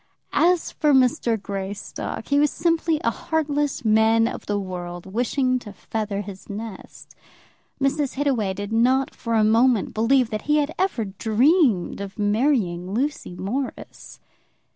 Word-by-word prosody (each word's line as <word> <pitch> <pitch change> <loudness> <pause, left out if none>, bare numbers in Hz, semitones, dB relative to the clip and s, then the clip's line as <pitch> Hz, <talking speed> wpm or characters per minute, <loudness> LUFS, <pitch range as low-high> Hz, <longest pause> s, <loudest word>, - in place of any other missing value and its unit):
As 340 +3 +2
for 300 -2 +2
Mr. 245 -3 +2
Greystock, 195 0 -5
he 285 0 +3
was 295 0 +4
simply 330 0 0
a 230 - +2
heartless 295 -3 -1
man 220 +1 +4
of - - -6
the 205 - 0
world, 175 -2 -6
wishing 250 +5 0
to 215 -4 -10
feather 210 0 -4
his 195 -2 -10
nest. 210 -1 -8 0.7
Mrs. 275 0 0
Hittaway 250 -9 0
did 205 +2 -5
not 255 +4 +2
for 230 -2 -3
a 220 - +4
moment 225 +1 +3
believe 235 +2 +2
that 215 - -2
he 300 - +4
had 300 +1 0
ever 370 - 0
dreamed 220 - +2
of 200 0 -7
marrying 205 -5 +1
Lucy 275 -7 -2
Morris. 250 +9 -5
230 Hz, 140 wpm, -23 LUFS, 205-280 Hz, 0.7 s, was